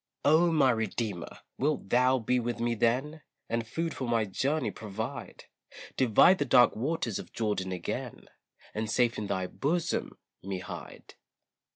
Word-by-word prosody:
Oh! 160 Hz, +4 st, +5 dB
my 140 Hz, -5 st, +4 dB
Redeemer, 110 Hz, -5 st, -3 dB, 0.2 s
wilt 145 Hz, -7 st, 0 dB
thou 125 Hz, +3 st, +4 dB
be 125 Hz, +1 st, +1 dB
with 120 Hz, 0 st, -3 dB
me 120 Hz, 0 st, +1 dB
then, 130 Hz, +8 st, 0 dB, 0.3 s
And 115 Hz, 0 st, -2 dB
food 165 Hz, +5 st, -2 dB
for 130 Hz, -, -4 dB
my 115 Hz, -2 st, +2 dB
journey 140 Hz, +10 st, -1 dB
provide, 110 Hz, 0 st, -6 dB, 0.5 s
Divide 130 Hz, -, +5 dB
the -, -, +1 dB
dark 125 Hz, -2 st, +5 dB
waters 125 Hz, -, -2 dB
of -, -, -9 dB
Jordan 105 Hz, -4 st, -1 dB
again, 90 Hz, -2 st, -5 dB, 0.5 s
And 110 Hz, 0 st, -3 dB
safe 120 Hz, +1 st, +2 dB
in 105 Hz, -, -4 dB
thy 95 Hz, -2 st, -1 dB
bosom 165 Hz, -, -2 dB, 0.2 s
me 95 Hz, 0 st, -4 dB
hide. 90 Hz, -, -9 dB
120 Hz, 150 wpm, -29 LUFS, 110-140 Hz, 0.5 s, Oh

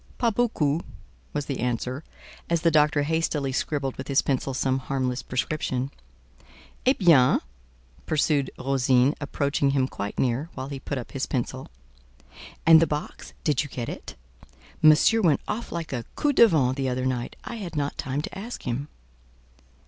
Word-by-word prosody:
"Pas 235 Hz, -3 st, +1 dB
beaucoup," 170 Hz, -10 st, +1 dB, 0.5 s
was 145 Hz, -1 st, -2 dB
the 135 Hz, -, -4 dB
answer, 125 Hz, +3 st, -2 dB, 0.5 s
as 170 Hz, -1 st, +1 dB
the 165 Hz, -, +3 dB
doctor 150 Hz, -1 st, +3 dB
hastily 150 Hz, -3 st, 0 dB
scribbled 135 Hz, 0 st, -2 dB
with 130 Hz, -, -6 dB
his 140 Hz, -1 st, +3 dB
pencil 135 Hz, 0 st, -1 dB
some 130 Hz, 0 st, 0 dB
harmless 130 Hz, -1 st, -2 dB
prescription. 130 Hz, 0 st, -2 dB, 1.0 s
"Eh 260 Hz, -, +7 dB
bien!" 165 Hz, -, +5 dB, 0.7 s
pursued 145 Hz, -3 st, +1 dB
Rosine, 130 Hz, 0 st, +3 dB
approaching 140 Hz, 0 st, 0 dB
him 135 Hz, -1 st, +2 dB
quite 100 Hz, -5 st, -5 dB
near, 130 Hz, +5 st, 0 dB
while 130 Hz, +1 st, -5 dB
he 140 Hz, -1 st, -5 dB
put 140 Hz, +2 st, -4 dB
up 120 Hz, -, -6 dB
his 135 Hz, -, -3 dB
pencil. 130 Hz, +1 st, -3 dB, 1.0 s
"And 160 Hz, 0 st, +8 dB
the 165 Hz, -, +4 dB
box—did 150 Hz, 0 st, -2 dB
you 145 Hz, -, -6 dB
get 120 Hz, -3 st, -4 dB
it? -, -, -8 dB, 0.7 s
Monsieur 155 Hz, +9 st, +6 dB
went 160 Hz, -8 st, +3 dB
off 225 Hz, +3 st, -4 dB
like 165 Hz, -4 st, -4 dB
a 120 Hz, -2 st, -2 dB
coup 295 Hz, -1 st, +1 dB
de 235 Hz, -, +8 dB
vent 135 Hz, -, +2 dB
the 135 Hz, -1 st, 0 dB
other 130 Hz, 0 st, -2 dB
night; 125 Hz, -2 st, -2 dB
I 235 Hz, -, -6 dB
had 185 Hz, -6 st, -6 dB
not 145 Hz, -1 st, -1 dB
time 135 Hz, +2 st, -2 dB
to -, -, -6 dB
ask 225 Hz, +5 st, -7 dB
him." 130 Hz, +3 st, -3 dB
140 Hz, 165 wpm, -25 LUFS, 130-160 Hz, 1.0 s, And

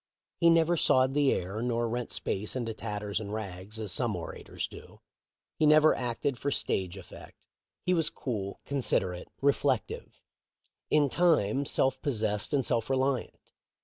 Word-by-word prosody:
He 170 Hz, -, +6 dB
never 165 Hz, +1 st, +4 dB
sawed 130 Hz, -3 st, +3 dB
the 145 Hz, -1 st, +3 dB
air 95 Hz, +5 st, -2 dB
nor 120 Hz, -1 st, 0 dB
rent 120 Hz, +1 st, -3 dB
space 105 Hz, +5 st, -2 dB
into 115 Hz, -3 st, -2 dB
tatters 105 Hz, -2 st, -3 dB
and 105 Hz, -2 st, -6 dB
rags 100 Hz, -1 st, -6 dB
as 110 Hz, -4 st, -3 dB
some -, -, -1 dB
orators -, -, -5 dB
do. -, -, -13 dB, 0.6 s
He 155 Hz, -, +4 dB
never 155 Hz, +1 st, +6 dB
acted 125 Hz, +2 st, -2 dB
for 140 Hz, -, -1 dB
stage 95 Hz, -8 st, -1 dB
effect. 95 Hz, -, -12 dB, 0.5 s
He 180 Hz, -, +2 dB
was 165 Hz, -3 st, +2 dB
cool, 100 Hz, -6 st, -4 dB
considerate, 95 Hz, -10 st, 0 dB, 0.2 s
reflective 140 Hz, -3 st, 0 dB, 0.4 s
— -, -, -62 dB, 0.3 s
in 150 Hz, -1 st, +4 dB
time 140 Hz, -, +2 dB
self 135 Hz, -, +1 dB
pos 145 Hz, -3 st, 0 dB
sessed 105 Hz, -1 st, -1 dB
and 140 Hz, -4 st, +1 dB
self 115 Hz, -1 st, 0 dB
reliant. 135 Hz, -1 st, -1 dB
125 Hz, 155 wpm, -29 LUFS, 105-140 Hz, 0.6 s, He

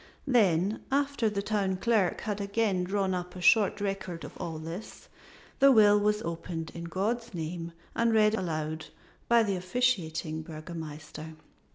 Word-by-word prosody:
Then 205 Hz, -, +3 dB
after 280 Hz, -4 st, +1 dB
the 200 Hz, -1 st, -2 dB
Town 200 Hz, -3 st, 0 dB
Clerk 210 Hz, -2 st, +1 dB
had 210 Hz, -1 st, -3 dB
again 200 Hz, -2 st, 0 dB
drawn 190 Hz, 0 st, 0 dB
up 180 Hz, 0 st, -4 dB
a -, -, -7 dB
short 205 Hz, +2 st, +4 dB
record 195 Hz, -4 st, -3 dB
of -, -, -9 dB
all 160 Hz, -1 st, -4 dB
this 165 Hz, +6 st, -8 dB, 0.5 s
the 275 Hz, 0 st, +7 dB
will 210 Hz, -3 st, +6 dB
was 210 Hz, +1 st, +1 dB
opened 165 Hz, 0 st, -4 dB
in 170 Hz, 0 st, -6 dB
God's 220 Hz, +6 st, -2 dB
name 165 Hz, +1 st, -4 dB, 0.2 s
and 230 Hz, 0 st, +2 dB
read 215 Hz, -1 st, +4 dB
aloud 160 Hz, -5 st, -2 dB, 0.4 s
by 235 Hz, -1 st, +6 dB
the 200 Hz, -3 st, 0 dB
officiating 180 Hz, -6 st, 0 dB
Burgomaster. 155 Hz, -1 st, -8 dB
190 Hz, 150 wpm, -29 LUFS, 165-215 Hz, 0.5 s, the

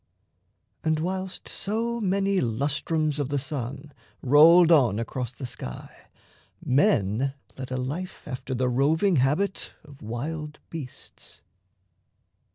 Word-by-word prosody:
And 155 Hz, -1 st, +1 dB
whilst 185 Hz, +2 st, -4 dB
so 230 Hz, +3 st, -2 dB
many 195 Hz, 0 st, +1 dB
lustrums 150 Hz, +5 st, -1 dB
of 140 Hz, -2 st, -1 dB
the 145 Hz, -, 0 dB
sun 140 Hz, +1 st, -5 dB, 0.3 s
Rolled 160 Hz, +6 st, +7 dB
on 125 Hz, -, +5 dB
across 120 Hz, +2 st, -3 dB
the 130 Hz, +1 st, -7 dB
sky, 120 Hz, -, -9 dB, 0.6 s
men 130 Hz, -, +2 dB, 0.2 s
led 130 Hz, -1 st, -7 dB
a 130 Hz, -, -2 dB
life 150 Hz, +9 st, -5 dB
After 130 Hz, -1 st, -4 dB
the 125 Hz, +1 st, +1 dB
roving 155 Hz, +9 st, +2 dB
habit 150 Hz, +10 st, 0 dB
of 140 Hz, -2 st, -15 dB
wild 150 Hz, +7 st, -5 dB
beasts. 145 Hz, -6 st, -9 dB
145 Hz, 115 wpm, -26 LUFS, 130-170 Hz, 0.6 s, Rolled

